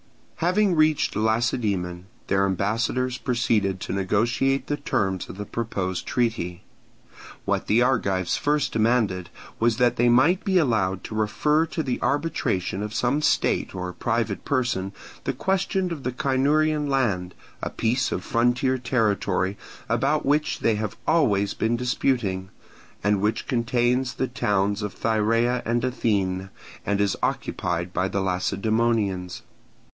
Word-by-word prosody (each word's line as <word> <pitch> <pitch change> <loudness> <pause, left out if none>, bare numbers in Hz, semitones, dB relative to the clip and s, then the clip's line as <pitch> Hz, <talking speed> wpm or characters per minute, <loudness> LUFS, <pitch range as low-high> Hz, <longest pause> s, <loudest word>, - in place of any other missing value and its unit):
Having 185 +2 +2
reached 155 -1 +2
Lacedaemon, 105 -5 0 0.2
their 100 0 +2
ambassadors 115 +7 -1
proceeded 110 -6 0
to - - -4
negotiate 115 +8 +1
the 145 - -2
terms 95 - -1
of - - -8
the 105 - -5
proposed 95 -5 -3
treaty. 100 -7 -1 0.8
What - - -1
the 115 +3 +4
Argives 100 -8 +1
first 150 -1 +1
demanded 110 -6 +1 0.3
was 115 -1 +2
that 125 -1 +2
they 120 +1 +4
might 155 +10 +4
be 195 -3 +2
allowed 105 - +1
to - - -7
refer 150 +9 +1
to 160 0 -3
the 130 -3 -2
arbitration 130 - -1
of 105 +1 -4
some 130 +6 +1
state - - +1
or 90 -1 -4
private - - -1
person 120 -8 -1 0.3
the - - 0
question 190 -1 0
of 160 -4 -4
the 125 - -2
Cynurian 150 +3 +1
land, 105 -10 0 0.3
a - - -2
piece 120 +3 0
of - - -2
frontier 125 +2 +1
territory 105 -6 0 0.3
about - - +1
which 150 +2 +1
they 115 - +3
have 105 -1 -4
always 105 -11 +2
been 115 +1 0
disputing, 115 -6 0 0.5
and 105 -1 +2
which 110 +2 0
contains 120 +1 +1
the 130 - -1
towns 105 -4 0
of 105 -1 -4
Thyrea 115 +3 +1
and 120 +1 0
Anthene, 100 -7 0 0.4
and 100 0 +1
is 100 -2 +2
occupied 85 +1 -2
by 95 - +1
the 100 0 -1
Lacedaemonians. 100 0 0
115 Hz, 140 wpm, -24 LUFS, 100-130 Hz, 0.8 s, the